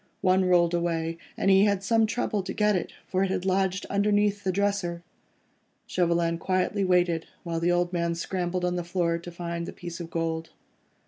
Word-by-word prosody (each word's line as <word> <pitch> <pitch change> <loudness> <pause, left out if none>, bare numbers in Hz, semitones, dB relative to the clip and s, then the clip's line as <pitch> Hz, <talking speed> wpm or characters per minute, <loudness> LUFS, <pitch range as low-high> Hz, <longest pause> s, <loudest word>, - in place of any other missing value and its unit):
One 185 0 +3
rolled 175 -1 +4
away, 165 -1 -1 0.2
and 195 - +3
he 195 +1 +6
had 200 -2 +1
some 225 +1 +3
trouble 225 -3 -1
to 190 +1 -6
get 210 -1 +3
it, 180 - -2
for 185 +1 0
it 195 - 0
had 185 -1 -2
lodged 190 0 +1
underneath 205 0 +1
the 190 - +1
dresser. 195 -3 -1 0.8
Chauvelin 170 -1 +1
quietly 185 +3 0
waited 175 -3 +2 0.2
while 165 -1 -2
the 170 +1 +2
old 175 0 +1
man 170 -1 0
scrambled 180 +1 -2
on 180 0 0
the 175 - -2
floor, 170 -1 0
to 175 +1 -9
find 170 0 -4
the - - -5
piece 175 -1 -7
of 170 -1 -6
gold. 165 -1 -2
180 Hz, 190 wpm, -27 LUFS, 170-195 Hz, 0.8 s, he